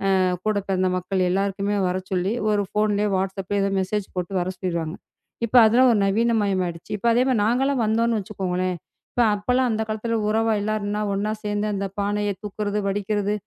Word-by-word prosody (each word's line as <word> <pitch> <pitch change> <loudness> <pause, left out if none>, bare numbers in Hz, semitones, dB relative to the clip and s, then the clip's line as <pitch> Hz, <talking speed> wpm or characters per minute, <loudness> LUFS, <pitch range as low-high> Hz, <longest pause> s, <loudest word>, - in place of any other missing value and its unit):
ஆ - - +3 0.3
கூடப் 205 -2 0
பிறந்த 185 -1 +1
மக்கள் 185 0 0
எல்லாருக்குமே 200 +1 0
வரச்சொல்லி 185 +1 -1 0.2
ஒரு 205 -1 +2
ஃபோன்லயே 210 0 +1
WhatsApp-லயோ 195 +1 -2
ஏதோ 200 - +1
மெஜேஸ் 195 +1 -2
போட்டு 180 +2 -3
வரச் 185 +1 -3
சொல்லிருவாங்க. 170 -2 -2 0.5
இப்ப 245 +3 +2
அதெல்லாம் 250 +3 +5
ஒரு 215 - +2
நவீனமயம் 205 -2 +1
ஆயிடுச்சு. 170 -1 -7
இப்ப 220 +4 -2
அதே 245 - +3
மாரி 250 -5 +2
நாங்க 240 +5 +2
எல்லாம் 275 -3 +1
வந்தோம்ன்னு 225 +1 +1
வச்சுக்கோங்களேன், 185 -2 -2 0.6
அப்ப 205 +4 -10
எல்லாம் 255 0 +2
அந்தக் 220 0 -1
காலத்துல 225 +1 -1
உறவு 225 +1 +2
எல்லாருன்னா 210 0 -2
ஒன்னா 205 +2 -1
சேர்ந்து 210 0 -1
அந்தப் 195 0 -4
பானைய 205 0 0
தூக்குறது, 210 0 -2
வடிகிறது, 205 +1 -1
205 Hz, 170 wpm, -23 LUFS, 190-215 Hz, 0.6 s, அதெல்லாம்